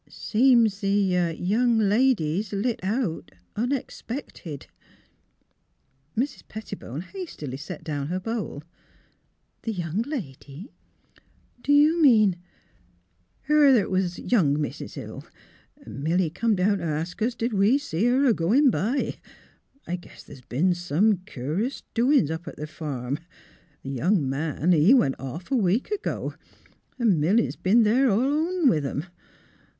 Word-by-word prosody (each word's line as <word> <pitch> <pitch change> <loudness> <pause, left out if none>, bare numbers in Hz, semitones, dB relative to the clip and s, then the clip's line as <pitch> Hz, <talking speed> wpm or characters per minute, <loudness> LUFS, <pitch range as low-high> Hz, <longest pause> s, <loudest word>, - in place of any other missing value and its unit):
" - - -31
Seems 230 -3 +3
th' 190 -5 +1
young 230 +5 +2
lady's 210 -4 +2
lit 215 +4 -1
out, 200 -2 -2 0.3
unexpected." 235 - -4 1.5
Mrs. 265 +5 -1
Pettibone 200 - -7
hastily 185 - -7
set 150 +4 -8
down 145 -3 -3
her 180 +3 -2
bowl. 210 -7 -4 0.5
" - - -45
The 225 - -3
young 175 +1 -2
lady? 190 - -7 0.9
Do 285 - -1
you 305 +4 +5
mean 215 - +5 0.4
" 90 -2 -37
" 90 +1 -42
Her 300 +1 +4
'at 245 -9 +4
was 185 -1 0
young 155 - +2
Mis' 150 - -5
Hill. - - -8 0.6
Milly 160 +4 -1
come 220 +5 +1
down 195 +2 +1
t' - - -6
ask 165 +4 -3
us, 235 +2 0
did 235 0 -2
we 205 +6 +4
see 225 - -2
her 255 +3 +3
a 245 - +5
goin' 240 - +3
by? 235 +8 -1 0.7
I 180 - -3
guess 175 - -14
the's 135 - -13
b'en 150 +10 +1
some 175 +4 +1
cur 150 - -3
'us 265 +3 -4
doin's 240 - +3
up 160 +2 -5
t' - - -7
th' 150 - -7
farm. 140 -4 -4 0.6
The 135 - -5
young 160 - +1
man, 150 +4 -1
he 175 - +6
went 140 - +2
off 135 - -7
a - - +3
week 220 - +1
ago. 420 0 -3 0.7
'N' 215 -9 +3
Milly 195 +10 +3
's - - -7
b'en 225 +5 +3
there 250 +5 +3
alone 295 - +1
with 155 - +3
'em. 140 +3 -3
195 Hz, 145 wpm, -25 LUFS, 155-240 Hz, 1.5 s, he